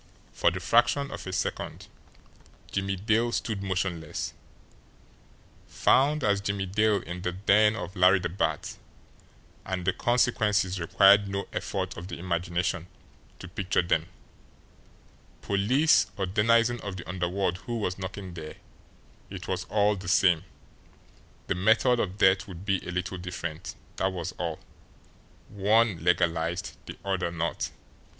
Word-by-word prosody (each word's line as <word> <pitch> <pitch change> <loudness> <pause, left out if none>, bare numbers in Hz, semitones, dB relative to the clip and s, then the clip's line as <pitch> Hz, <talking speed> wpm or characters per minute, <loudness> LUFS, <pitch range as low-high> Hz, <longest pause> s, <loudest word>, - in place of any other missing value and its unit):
For - - +3
the - - -4
fraction 140 -1 +2
of - - -7
a - - -4
second 95 - -3 0.8
Jimmie 95 0 -1
Dale 110 +5 +1
stood 110 -3 -2
motionless. 90 -4 -3 1.3
Found 145 +2 +3
as 100 -1 +2
Jimmie 100 -1 -2
Dale 105 +2 +1
in 85 +2 -6
the 90 - -1
den 105 +3 +4
of 95 -3 -6
Larry 90 +1 +6
the 90 -1 -2
Bat, 80 -3 -2 0.9
and 95 -2 -4
the 95 - +2
consequences 105 -6 +1
required 100 +4 +5
no 100 0 -3
effort - - -3
of 85 - -7
the - - -6
imagination 85 -1 -2 0.5
to 95 - -9
picture 95 -1 0
them; 85 -1 +1 1.4
police 125 +11 +3
or 95 - 0
denizen 115 +5 +3
of 100 -2 -5
the 90 - -8
underworld 90 +1 -1
who 120 -1 -2
was 95 -4 -2
knocking 95 -1 -6
there, 80 -2 -8 0.7
it - - -8
was - - -2
all 105 0 +2
the 95 -1 -8
same, 90 -3 +3 1.0
the - - 0
method 110 +6 +3
of 95 -2 -2
death 95 +1 +4
would 95 -1 -9
be 95 -2 +2
a - - -9
little 90 +1 -3
different, 90 -2 -6 0.2
that 95 0 +1
was 90 -1 -4
all 85 -3 -2 0.9
one 105 -3 +2
legalised, 85 -1 0
the - - -8
other 95 -3 0
not. 85 0 -2
95 Hz, 140 wpm, -27 LUFS, 90-105 Hz, 1.4 s, Larry